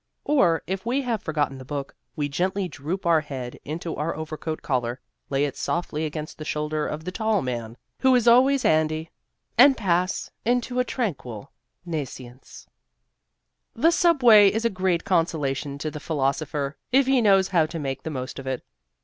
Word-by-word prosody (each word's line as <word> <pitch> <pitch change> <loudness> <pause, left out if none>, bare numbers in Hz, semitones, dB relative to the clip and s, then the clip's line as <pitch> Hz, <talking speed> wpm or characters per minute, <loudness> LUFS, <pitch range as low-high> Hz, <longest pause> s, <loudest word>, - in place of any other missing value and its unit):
Or, 175 - +3
if 190 +3 -3
we 255 +4 0
have 230 -5 -1
forgotten 145 -4 -1
the - - -8
book, 140 +1 -5 0.2
we 145 -2 -1
gently 185 +6 -1
droop 165 +5 -5
our 165 -2 +4
head 130 -5 -7
into 165 +2 -5
our 155 +2 -2
overcoat 155 0 -5
collar, 125 -2 -1 0.3
lay 140 +1 +1
it 140 - -4
softly 160 -2 -2
against 155 +1 -7
the - - -5
shoulder 150 0 -2
of 150 +1 -5
the 180 - -4
tall 220 -1 0
man 120 -2 -4 0.2
who 260 -1 +4
is 240 -1 +2
always 260 +3 +5
handy, 155 +1 +1 0.5
and 275 -2 +8
pass 185 -2 0
into 245 +1 0
a - - +4
tranquil 140 - -4 0.3
nescience. 130 -6 -7 1.1
The 320 +9 +4
subway 245 - +6
is 225 +2 -2
a 230 - +2
great 185 -3 0
consolation 150 -6 0
to 155 +2 -4
the 150 - -7
philosopher 145 -1 -2
if 270 +1 +5
he 265 -1 +3
knows 195 -3 +4
how 165 -5 +3
to 165 - -6
make 135 -3 -3
the - - -5
most 130 -2 -5
of 135 - -8
it. 130 -2 -3
160 Hz, 175 wpm, -25 LUFS, 145-205 Hz, 1.1 s, and